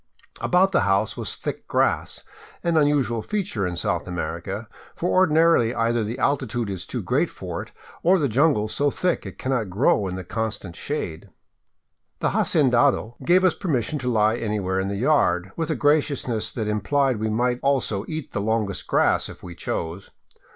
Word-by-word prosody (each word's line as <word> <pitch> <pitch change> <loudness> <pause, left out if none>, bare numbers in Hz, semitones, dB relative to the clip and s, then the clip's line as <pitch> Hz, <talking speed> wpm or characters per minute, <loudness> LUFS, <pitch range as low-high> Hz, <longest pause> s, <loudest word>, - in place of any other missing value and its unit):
About 185 +2 +3
the 175 - +3
house 100 +2 +1
was - - -2
thick - - -6
grass, - - 0 0.4
an 170 -1 +1
unusual 145 -7 +2
feature 175 - -2
in 90 - -4
South 85 - -1
Amer 85 -1 -3
ica, 100 +6 -5 0.3
for 175 - -1
ordinarily 165 -9 +4
either 115 0 +1
the 110 +4 -4
altitude 125 -5 0
is 95 - -5
too - - -4
great - - +1
for - - -6
it, - - -11 0.3
or 185 +3 +4
the 150 -5 +1
jungle 130 -3 +2
so 145 +6 +1
thick 175 - -1
it 95 -1 -9
cannot 125 -6 -1
grow 100 0 +2
in 90 - -4
the 95 - -5
constant 100 -3 -4
shade. 95 - -4 0.9
The - - 0
hacendado 120 -4 +2
gave 180 +2 +4
us 185 -3 +4
permission 150 - -1
to 125 -1 -1
lie 110 0 +3
anywhere 105 -5 -1
in 95 - -1
the 100 - -2
yard, 100 - +2
with 165 -2 -2
a - - +1
graciousness 145 -6 +1
that 110 -3 -3
im 105 0 -1
plied 135 +1 +1
we 110 +1 -1
might 120 +3 0
also 130 -8 +1
eat 155 -3 -5
the - - -2
longest 110 -2 -1
grass - - +2
if - - -12
we 90 - -8
chose. 85 +2 -4
115 Hz, 180 wpm, -24 LUFS, 100-145 Hz, 0.9 s, ordinarily